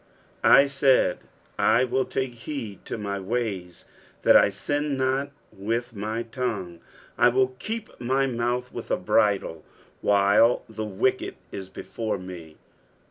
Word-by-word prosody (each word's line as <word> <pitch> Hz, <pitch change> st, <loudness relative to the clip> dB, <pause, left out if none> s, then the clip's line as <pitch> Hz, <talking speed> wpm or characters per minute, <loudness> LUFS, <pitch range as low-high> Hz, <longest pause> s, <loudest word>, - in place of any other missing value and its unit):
I 140 Hz, -, +7 dB
SAID, 140 Hz, -1 st, +3 dB, 0.4 s
I 115 Hz, +3 st, +4 dB
will 130 Hz, +1 st, 0 dB
take 130 Hz, -1 st, -2 dB
heed 115 Hz, -3 st, -7 dB
to -, -, -4 dB
my 100 Hz, -2 st, -3 dB
ways, 95 Hz, -4 st, -4 dB, 0.4 s
that -, -, +6 dB
I -, -, +7 dB
sin 145 Hz, +8 st, -2 dB
not 135 Hz, +2 st, 0 dB, 0.2 s
with 115 Hz, +5 st, -3 dB
lO)^ 110 Hz, +2 st, -4 dB
tongue: 100 Hz, -10 st, -3 dB, 0.4 s
I -, -, +6 dB
will 130 Hz, +1 st, +2 dB
keep 220 Hz, +6 st, -6 dB
my 130 Hz, +3 st, +1 dB
mouth 125 Hz, 0 st, -2 dB
with -, -, -7 dB
a -, -, +1 dB
bridle, 95 Hz, -6 st, +1 dB, 0.4 s
while 100 Hz, +4 st, +4 dB
thewicked 110 Hz, +5 st, -1 dB, 0.2 s
is 95 Hz, -1 st, -7 dB
before 110 Hz, +2 st, -4 dB
me. 90 Hz, -4 st, -10 dB
115 Hz, 135 wpm, -25 LUFS, 100-130 Hz, 0.4 s, I